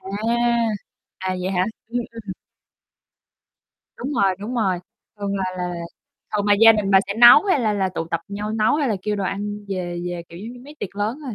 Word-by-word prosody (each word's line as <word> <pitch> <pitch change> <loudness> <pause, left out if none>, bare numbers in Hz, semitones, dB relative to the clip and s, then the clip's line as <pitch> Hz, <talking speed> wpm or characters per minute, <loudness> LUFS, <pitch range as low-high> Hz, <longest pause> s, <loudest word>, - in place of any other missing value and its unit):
À, 190 - -11 1.1
à, 185 0 -2
vậy 185 +1 -2
hả? 185 -1 +1 0.2
Ừm, 240 +2 -2
ừm. 225 -4 -7 1.6
Đúng 270 +4 -4
rồi, 195 -7 +2
đúng 215 +5 -5
rồi, 195 -7 +1 0.4
thường 200 -1 -2
là 190 - -1
là 180 0 -2
là 175 - -4 0.6
thường 205 0 -1
là 205 - +6
gia 225 0 +9
đình 210 -3 -1
bà 195 - +7
sẽ 200 - -3
nấu, 240 +6 +9
hay 375 -9 +2
là 220 -3 +1
là 195 -2 0
tụ 175 -2 -4
tập 165 - 0
nhau 205 +1 -4
nấu, 220 -1 +2
hay 290 -3 +1
là 215 - 0
kêu 210 +1 -1
đồ 200 - -2
ăn 205 +2 -4
về 175 -3 -3
về, 175 -1 -4
kiểu, 170 - -11
giống 220 +5 -7
như, 245 - -12
mấy 295 +2 -12
tiệc 200 0 -6
lớn 215 +6 -1
thôi, 250 -5 -5
205 Hz, 220 wpm, -22 LUFS, 190-225 Hz, 1.6 s, gia